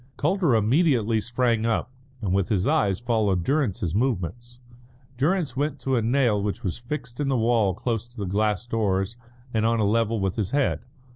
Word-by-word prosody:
Calder 170 -4 +2
immediately 115 - +2
sprang 120 -1 0
up, 115 +2 0 0.3
and 95 -3 0
with 95 -1 +1
his 95 -4 +1
eyes 100 -3 +2
followed 110 -7 +1
Durrance's 120 - 0
movements. 120 - -2 0.6
Durrance 155 +2 0
went 145 +1 -1
to 135 -1 0
a 120 - +2
nail 115 -3 +2
which 100 0 -3
was 90 +1 -3
fixed 125 0 -6
in 145 - 0
the 135 -2 +1
wall 110 -5 +2
close 115 +1 -2
to 120 - -24
the 100 - -3
glass 105 +3 0
doors 105 -3 0 0.4
and 110 -1 +1
on 115 0 +2
a 105 - +2
level 115 +1 +1
with 95 +1 -1
his 105 -4 -1
head. 140 +2 +1
115 Hz, 185 wpm, -25 LUFS, 105-125 Hz, 0.6 s, Calder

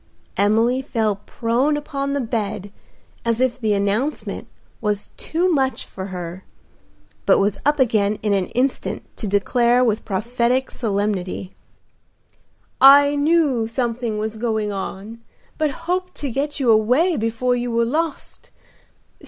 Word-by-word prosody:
Emily 225 +6 +2
fell 220 -6 -1
prone 250 +6 +1
upon 280 -1 -3
the 285 - 0
bed 210 -4 -3 0.5
as 230 0 0
if 255 0 0
the 215 -2 +2
announcement 205 +9 -1 0.3
was 210 -2 -2
too 340 +3 -1
much 270 -7 0
for 190 0 -7
her, 180 -1 -6 0.8
but - - +6
was 200 0 +1
up 295 0 +2
again 215 -5 +2
in 210 -2 +2
an 195 -2 +1
instant 260 +2 -1
to 215 - -2
declare 235 +5 +3
with 220 -3 +1
prophetic 240 +5 0
solemnity, 200 -4 -2 1.3
"I 285 +2 +8
knew 290 -6 +2
something 230 -2 -2
was 220 +1 -3
going 220 -2 -1
on, 200 +3 -6 0.4
but 310 -1 +2 0.2
hoped 365 +1 -2
to 280 -3 -4
get 290 +4 -2
you 250 -4 +3
away 250 +11 +3
before 230 +1 0
you 245 0 -2
were 230 0 +1
lost. 315 +5 -3
235 Hz, 135 wpm, -21 LUFS, 210-270 Hz, 1.3 s, I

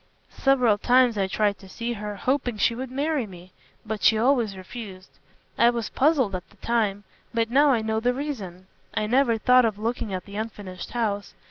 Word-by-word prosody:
Several 250 -6 +3
times 250 0 +4
I 195 -2 0
tried 205 +1 0
to 195 - -14
see 235 +4 -4
her, 210 -1 -5
hoping 250 +1 -1
she 230 - +2
would 255 +2 -5
marry 280 -1 -1
me. 180 -1 -13 0.3
But 215 -1 -4
she 220 - +5
always 230 -4 +2
refused. 190 -1 -10 0.4
I 235 - +6
was 235 -2 -2
puzzled 270 -7 +2
at 185 -1 -5
the 210 - -23
time, 210 -3 0 0.3
but 230 0 0
now 285 +3 +5
I 235 -5 +2
know 220 0 0
the 245 +2 +2
reason. 205 -11 -5 0.3
I 215 - 0
never 240 0 +3
thought 250 +3 +5
of 220 -3 0
looking 225 -1 -3
at 185 -1 -4
the 200 0 -8
unfinished 205 -4 -6
house. 210 -4 -2
225 Hz, 195 wpm, -25 LUFS, 205-250 Hz, 0.4 s, I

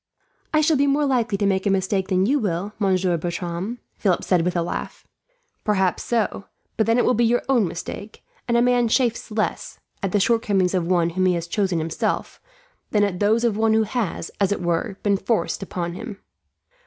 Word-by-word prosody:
"I 310 - +3
shall 310 0 +3
be 280 +1 +3
more 285 +1 +2
likely 245 -6 +1
to 200 - 0
make 195 0 +1
a - - +3
mistake 190 0 0
than 185 -1 +2
you 280 +7 +2
will, 200 -1 -2
Monsieur 185 -3 +2
Bertram," 175 +6 -4 0.2
Philip 185 -4 +1
said 180 -3 +2
with 180 +2 -1
a 170 - +1
laugh. 170 - -5 0.6
"Perhaps 190 -4 +1
so, 220 -4 -1 0.3
but 220 - +1
then 230 +1 +3
it 245 - +3
will 250 - +3
be 240 - +2
your 240 +1 +2
own 245 -8 +3
mistake; 200 +5 -7 0.2
and 235 -1 +2
a 235 - +4
man 245 -1 +3
chafes 235 0 +1
less, 215 0 -3 0.2
at 195 - -1
the 205 - +2
shortcomings 200 -4 +2
of 180 -3 0
one 170 -2 +2
whom 185 +2 +1
he 180 - +3
has 170 -1 -3
chosen 190 0 0
himself, 160 0 -2 0.5
than 210 -1 +2
at 190 -3 -1
those 220 +3 +2
of 230 -4 +2
one 220 0 +3
who 220 - +4
has, 215 -6 -3
as 200 -1 +2
it 200 - -1
were, 175 +3 -1
been 200 -1 +2
forced 210 +3 -1
upon 175 -3 -4
him." 210 +2 -7
200 Hz, 205 wpm, -23 LUFS, 180-230 Hz, 0.6 s, a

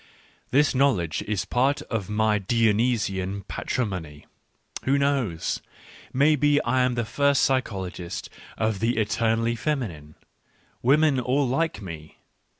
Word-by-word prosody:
This 145 +3 +3
knowledge 125 - +1
is 105 -3 -1
part 135 +4 +1
of 105 -4 -4
my 105 0 +2
Dionysian 105 -3 0
patrimony. 90 -11 -4 0.6
Who 135 +1 +3
knows? 135 -12 0 0.5
may 145 +4 +4
be 145 0 +3
I 130 +2 +1
am 125 -1 +1
the 120 -1 -1
first 140 +4 +2
psychologist 95 -9 -2 0.3
of 110 -2 0
the 115 +2 0
eternally 115 +2 +1
femi 135 -2 -1
nine. 75 -2 -13 0.7
Women 140 +1 +4
all 130 +3 +1
like 160 +6 0
m 95 -4 -8
e. 80 -1 -11
115 Hz, 130 wpm, -25 LUFS, 100-135 Hz, 0.7 s, may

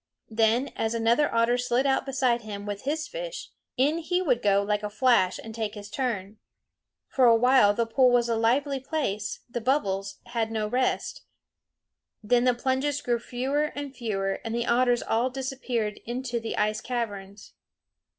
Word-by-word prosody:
Then, 225 +4 +2
as 225 +1 -1
another 235 +6 +2
otter 230 +2 +2
slid 250 +2 +1
out 270 0 +1
beside 255 -3 +1
him 205 -2 -7
with 205 +2 -5
his 310 +3 -1
fish, - - -6 0.3
in 290 +6 +2
he 355 +2 0
would 260 -10 +1
go 200 -1 +3
like 210 0 0
a 210 - -3
flash 215 -4 +3
and 225 - -9
take 220 -1 -3
his 205 0 -9
turn. 215 -6 -3 0.7
For 260 - +2
a 230 -1 +7
while 235 -3 +5
the 235 - +1
pool 250 +3 +4
was 240 -1 +3
a 230 - +1
lively 265 +5 +1
place; 260 -8 -3
the 240 0 -4
bubbles 195 -7 0
had 230 -2 -2
no 215 -1 -1
rest. 250 +4 -1 1.0
Then 240 +3 +3
the 250 -1 +3
plunges 265 +3 0
grew 240 -4 -1
fewer 265 +5 -1
and 285 -1 -6
fewer, 195 -5 -2
and 225 0 -3
the 235 0 -1
otters 240 0 +2
all 235 +3 +1
disappeared 255 -5 -3
into 245 0 -3
the 225 0 -5
ice 215 0 0
caverns. 205 -5 -5
240 Hz, 170 wpm, -26 LUFS, 215-260 Hz, 1.0 s, a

